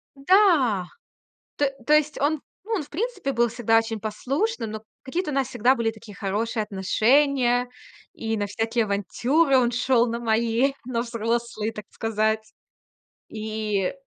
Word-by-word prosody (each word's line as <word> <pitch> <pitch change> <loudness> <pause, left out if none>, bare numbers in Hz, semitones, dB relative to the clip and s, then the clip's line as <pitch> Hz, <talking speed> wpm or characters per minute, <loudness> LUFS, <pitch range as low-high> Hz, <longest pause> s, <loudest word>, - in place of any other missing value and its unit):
М-да. 275 - +4 0.7
То 290 - +2 0.2
то 300 - +3
есть 305 0 +2
он, 295 +1 +1 0.2
ну, 455 - -6
он, 365 - -1
в 290 - -14
принципе, 385 - -2
был 235 -1 +2
всегда 225 -1 +2
очень 225 -1 -2
послушным, 250 - -2
но 215 0 -6 0.2
какие-то 320 +5 -3
у 280 - -3
нас 270 -2 +1
всегда 250 +5 +3
были 230 -3 0
такие 220 -1 -13
хорошие 215 +3 -2
отношения, 245 +5 +2 0.5
и 225 -1 -2
на 205 -1 -1
всякие 225 +2 -1
авантюры 260 - +2
он 240 -1 +3
шел 245 0 +2
на 235 +1 -2
мои, 230 +3 +1
на 235 -2 -1
взрослые, 230 -1 -2
так 210 - -8
сказать. 220 0 -1 0.8
И 215 -2 -2
235 Hz, 150 wpm, -24 LUFS, 220-275 Hz, 0.8 s, М-да